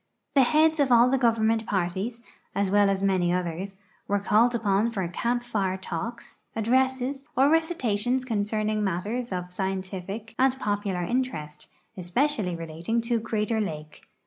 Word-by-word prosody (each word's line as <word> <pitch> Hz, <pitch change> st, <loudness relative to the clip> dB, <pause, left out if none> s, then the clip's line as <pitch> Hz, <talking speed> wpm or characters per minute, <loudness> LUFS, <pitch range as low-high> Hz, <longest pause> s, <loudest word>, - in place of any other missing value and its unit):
The 275 Hz, -, +6 dB
heads 310 Hz, +4 st, +4 dB
of 275 Hz, -3 st, +3 dB
all 240 Hz, +1 st, +6 dB
the 270 Hz, -, +2 dB
government 225 Hz, -2 st, +2 dB
parties, 195 Hz, +5 st, -2 dB, 0.3 s
as 200 Hz, -1 st, +1 dB
well 205 Hz, 0 st, +4 dB
as 195 Hz, 0 st, 0 dB
many 185 Hz, -3 st, +2 dB
others, 180 Hz, +2 st, -3 dB, 0.3 s
were 205 Hz, -, +2 dB
called 225 Hz, +4 st, +3 dB
upon 210 Hz, 0 st, +2 dB
for 195 Hz, -6 st, -2 dB
camp 240 Hz, +7 st, -1 dB
fire 200 Hz, -6 st, -1 dB
talks, 230 Hz, +6 st, -6 dB, 0.2 s
addresses, 260 Hz, +4 st, +1 dB
or 275 Hz, +3 st, +5 dB
recitations 255 Hz, -7 st, +1 dB
concerning 215 Hz, -1 st, -1 dB
matters 205 Hz, +6 st, -2 dB
of 180 Hz, -1 st, -4 dB
scientific 190 Hz, +3 st, -4 dB
and 265 Hz, 0 st, +4 dB
pop'ular 205 Hz, -6 st, -2 dB
interest, 155 Hz, -13 st, -3 dB, 0.3 s
especially 195 Hz, +1 st, 0 dB
relating 165 Hz, +7 st, -3 dB
to 230 Hz, 0 st, 0 dB
Crater 220 Hz, 0 st, -1 dB
lake. 155 Hz, -6 st, -6 dB
215 Hz, 145 wpm, -26 LUFS, 190-245 Hz, 0.3 s, The